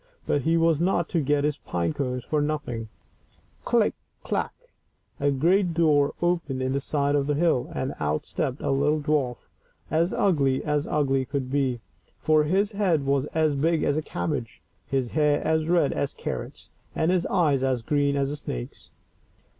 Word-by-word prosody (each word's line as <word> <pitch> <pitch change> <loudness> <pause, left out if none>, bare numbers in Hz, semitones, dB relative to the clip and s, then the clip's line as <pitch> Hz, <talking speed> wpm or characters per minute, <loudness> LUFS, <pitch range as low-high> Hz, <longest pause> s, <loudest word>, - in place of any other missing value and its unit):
But 145 - +1
he 165 +4 +2
was 165 -2 +3
not 175 -2 +1
to 165 - +1
get 145 0 +1
his 150 0 0
pine 85 -2 -2
cones 125 -2 -3
for 150 +3 0
nothing: 145 -7 -3 0.7
click! - - +2 0.3
clack! - - -1 0.4
— - - -41
a 145 - +2
great 170 +6 +2
door 150 -4 +3
opened 170 -6 0
in 130 0 -1
the 140 - 0
side 145 0 0
of 145 -1 +1
the 145 - +1
hill, 160 -5 +1
and 130 +2 -3
out 75 0 -1
stepped 140 -4 -3
a - - 0
little 145 +3 +2
dwarf, 145 -4 0 0.6
as 165 +3 +2
ugly 140 -9 +2
as 150 -1 0
ugly 135 -3 +1
could 130 -1 -4
be, 130 -4 0 0.4
for 155 -1 +3
his 195 +6 +1
head 185 -9 +1
was 140 0 +1
as 155 -2 +3
big 160 +3 +1
as 145 - +1
a 155 - 0
cabbage, 140 -5 -4 0.2
his 130 -3 -1
hair 150 -1 +2
as 160 0 +1
red 170 -5 +3
as 140 - -2
carrots, - - -6 0.2
and 160 +2 +2
his 185 -2 +1
eyes 150 -8 +2
as 130 -3 0
green 145 +1 +1
as 140 0 0
a - - -3
snake's. - - -7
145 Hz, 180 wpm, -25 LUFS, 135-160 Hz, 0.7 s, was